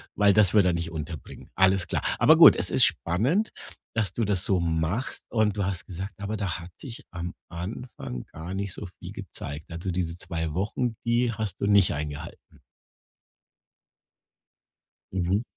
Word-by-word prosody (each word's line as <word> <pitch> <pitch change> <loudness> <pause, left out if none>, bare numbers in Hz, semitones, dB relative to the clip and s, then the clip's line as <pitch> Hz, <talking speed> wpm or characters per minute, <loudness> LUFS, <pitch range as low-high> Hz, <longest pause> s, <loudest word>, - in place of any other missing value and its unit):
weil 100 -1 +5
das 105 -2 +5
würde 100 -4 +5
er - - +1
nicht 85 0 -3
unterbringen.“ 80 -2 -7
Alles 95 -1 +3
klar. - - -1 0.2
Aber - - +7
gut, - - +10
es - - -1
ist - - +7
spannend, 130 - +1 0.4
dass 105 -5 0
du 115 - -1
das 100 -3 +1
so 95 -2 +2
machst, 85 +8 -1
und 110 -3 +1
du 100 - +1
hast 95 -3 -3
gesagt: 95 +2 -6
„Aber 105 +2 -3
da 95 -3 -2
hat 85 +1 -10
sich 120 -4 -9
am 85 0 -5 0.2
Anfang 90 - -6
gar 85 +4 -7
nicht 100 0 -2
so 105 - -6
viel - - -8
gezeigt.“ 75 +2 -8
Also, 85 +2 -4
diese 85 -2 -2
2 80 -3 -4
Wochen, 105 +6 -1
die 120 0 +2
hast 105 -3 -3
du 100 - 0
nicht 100 -3 +5
eingehalten? 75 +2 -7 2.5
Mhm. 95 +3 +1
95 Hz, 165 wpm, -26 LUFS, 85-105 Hz, 2.5 s, gut